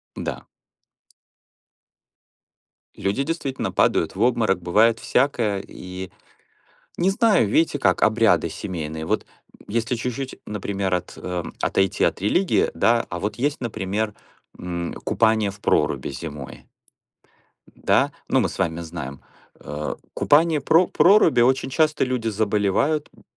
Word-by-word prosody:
Да. - - -5 2.5
Люди 100 +8 -1
действительно 140 -4 -3
падают 80 - +1
в 100 - -4
обморок, 110 -6 +2
бывает 110 +6 +3
всякое, 120 -7 +1
и, 90 0 -8 0.9
не 180 +2 +2
знаю, 205 - +3
видите 150 +6 +2
как, - - +2
обряды 110 -7 +3
семейные. 80 -3 -5
Вот, - - -1 0.3
м, - - -19
если 115 +3 -1
чуть-чуть, 125 +3 -5
например, 100 -2 -3
от 90 - -2
а, 90 -1 -4 0.2
отойти 95 -1 +1
от - - +1
религии, 175 - +2
да? 115 0 +2
А 85 - -4
вот 105 +3 -3
есть, 145 +4 -1
например, 105 -2 -2 0.4
м, 85 -1 -4
купание 110 -2 +2
в 100 - -15
проруби - - +1
зимой, 70 -1 -8 1.1
да? - - +2 0.2
Ну, - - +2
мы - - 0
с - - -9
вами 85 -3 -1
знаем. 80 -5 -7 0.4
Э, 75 +1 -5 0.2
купание 155 +1 +3
в 135 - -16
про 175 +3 +5
проруби- 175 - +5
очень 130 +2 +2
часто 155 +2 +2
люди 125 -3 -2
заболевают, 110 +8 0
м, - - -21
110 Hz, 130 wpm, -23 LUFS, 90-130 Hz, 2.5 s, про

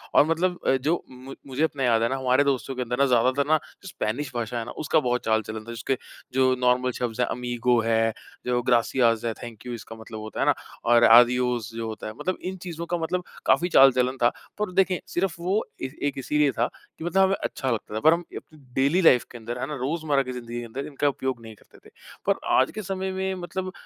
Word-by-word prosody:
और - - +7
मतलब 175 +3 0
अ, 135 - +5
जो 155 +7 -1
मु 130 +2 -10
मुझे 135 +3 -1
अपना 145 -4 0
याद 115 -2 +3
है 115 - +2
ना 135 - -1
हमारे 130 +1 +3
दोस्तों 135 -1 -1
के 125 - -3
अंदर 125 0 -2
ना 140 - +5
ज़्यादातर 130 +3 +2
ना 155 - +5 0.3
स्पेनिश 140 - -3
भाषा 120 0 -2
है 115 - -4
ना - - -7
उसका 155 +1 +3
बहुत 125 -3 -1
चाल-चलन 110 0 -1
था - - -6
जिसके 120 +3 -2 0.4
जो 130 0 +4
नॉर्मल 125 0 +2
शब्द 120 -3 -3
हैं - - +2
अमीगो 120 0 0
है, 115 0 +2 0.3
जो 125 0 +1
ग्रासिआस 120 -1 +2
है 115 - 0
थैंक 115 -2 -9
यू 125 - -5
इसका 115 -1 -8
मतलब 110 0 -9
होता 110 0 -7
है - - +2
ना, - - +5 0.3
और 120 0 +5
आदियोस 120 0 +5
जो 115 -1 -3
होता 110 -1 -6
है, 110 - -6
मतलब 185 - -2
इन 190 +1 -5
चीज़ों 170 -1 -5
का 175 +1 -1
मतलब 175 +2 -2 0.2
काफ़ी 175 - +3
चाल-चलन 130 -3 +5
था। 120 - +6 0.3
पर 210 -3 -1
देखिए 185 -1 +2
सिर्फ 180 -1 -1
वो 190 +5 0 0.2
ए, 130 - -2
एक 145 -1 -1
इसीलिए 145 +2 +2
था - - 0 0.3
कि 160 - -7
मतलब 190 +2 +2
हमें 190 0 +3
अच्छा 130 -2 -2
लगता 110 -2 -3
था। 110 - 0
पर 160 +5 +6
हम 170 +1 -2 0.3
डेली 140 +4 0
लाइफ 125 -8 +6
के 120 - -8
अंदर 120 +2 -6
है 130 - -1
ना 150 - -4
रोज़मर्रा 145 +1 0
की 130 - -6
जिंदगी 120 -1 -6
के 120 - -6
अंदर 130 +5 -6
इनका 145 0 -1
उपयोग 130 -3 -3
नहीं 110 -1 -11
करते - - -21
थे। - - -18 0.3
पर - - +3 0.2
आज - - +3
के 215 - -3
समय 190 0 -3
में 190 0 -2
मतलब 185 +1 -5
130 Hz, 235 wpm, -25 LUFS, 120-155 Hz, 0.4 s, और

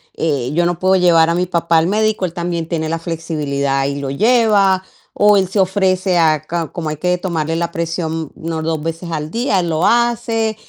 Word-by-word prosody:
yo 150 +2 0
no 175 -1 -1
puedo 185 +1 +2
llevar 170 -2 +4
a - - 0
mi 180 0 0
papá 170 -2 +1
al 165 - 0
médico, 215 -1 +1
él 170 - -5
también 170 -2 -3
tiene 160 -2 -2
la 165 +1 -2
flexibilidad 145 -5 -2
y 140 - -3
lo 135 -1 -4
lleva, 205 - +3 0.3
o 210 0 +5
él 190 -1 +2
se 200 - -1
ofrece 185 -1 +1
a 155 -3 +3
ca 165 0 -3
como 160 -3 -4
hay 150 - -4
que 180 +2 0
tomarle 165 -3 -2
la 170 0 -2
presión 165 -2 -3
unas 160 -1 -4
2 160 -1 -1
veces 165 +2 -5
al 155 0 -4
día, 230 -5 0
él 175 -1 -1
lo 160 +2 +1
hace. 230 -2 +1
170 Hz, 210 wpm, -17 LUFS, 160-190 Hz, 0.3 s, o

